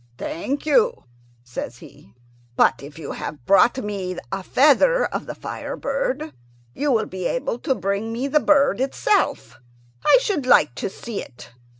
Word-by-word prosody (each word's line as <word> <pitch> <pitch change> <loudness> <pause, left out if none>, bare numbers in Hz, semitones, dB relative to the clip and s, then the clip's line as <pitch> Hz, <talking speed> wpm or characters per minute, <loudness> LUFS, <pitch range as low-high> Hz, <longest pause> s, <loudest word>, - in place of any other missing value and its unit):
"Thank 275 - -4
you," 475 +9 +2 0.4
says 120 -1 -6
he; 105 -2 -16 0.4
"but - - +3
if 145 +2 -11
you 155 -3 -6
have 145 -6 -7
brought 200 +6 +5
me 195 -6 -4
a 195 - -2
feather 295 - +4
of - - -4
the - - -6
fire - - -6
bird, - - -2 0.4
you 290 0 0
will 220 -3 +2
be 185 -1 -6
able 250 -2 -2
to 265 -1 0
bring 200 +3 -2
me 245 +4 -2
the 300 +2 +3
bird 280 -7 +3
itself. 395 +9 0 0.4
I 295 - +6
should 395 - -2
like 150 - +5
to 125 - -4
see 225 +2 -6
it. 120 -1 -13
235 Hz, 165 wpm, -22 LUFS, 185-290 Hz, 0.4 s, I